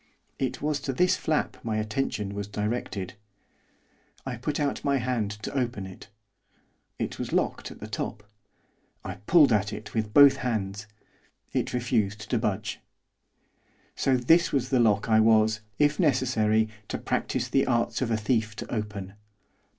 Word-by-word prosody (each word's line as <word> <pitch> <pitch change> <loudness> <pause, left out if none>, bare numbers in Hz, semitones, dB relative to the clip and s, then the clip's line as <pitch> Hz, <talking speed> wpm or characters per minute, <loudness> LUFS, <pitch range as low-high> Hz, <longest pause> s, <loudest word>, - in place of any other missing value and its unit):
It 130 +1 -2
was 150 -1 0
to 135 - -3
this 180 +7 +3
flap 155 -2 -1
my 110 -2 -1
attention 110 -2 -2
was 100 0 -4
directed. 105 -2 -3 1.1
I 135 -2 -3
put 145 +6 -3
out 145 -1 -1
my 140 -1 +2
hand 120 -4 -1
to - - -5
open 120 -7 -1
it; 95 -1 -11 0.9
it - - -4
was - - -4
locked - - 0
at - - -12
the - - -7
top. 105 0 -5 0.8
I - - -6
pulled 150 -8 +6
at 105 0 +1
it 105 0 -8
with 110 -2 -1
both 140 +2 +8
hands; 105 -5 -3 0.7
it - - 0
refused 110 -4 -1
to 120 - +2
budge. 105 -3 -2 1.2
So 130 -1 +2
this 165 +8 +4
was 130 -2 0
the 130 - +3
lock 105 -3 +3
I 110 -1 +5
was, 110 -1 +4 0.2
if 145 0 +2
necessary, 120 - +2 0.2
to - - -3
practise - - -1
the 135 - +2
arts 120 0 +1
of 125 - 0
a 110 - +1
thief 110 0 0
to - - -6
open. 105 -3 -4
115 Hz, 160 wpm, -27 LUFS, 105-130 Hz, 1.2 s, both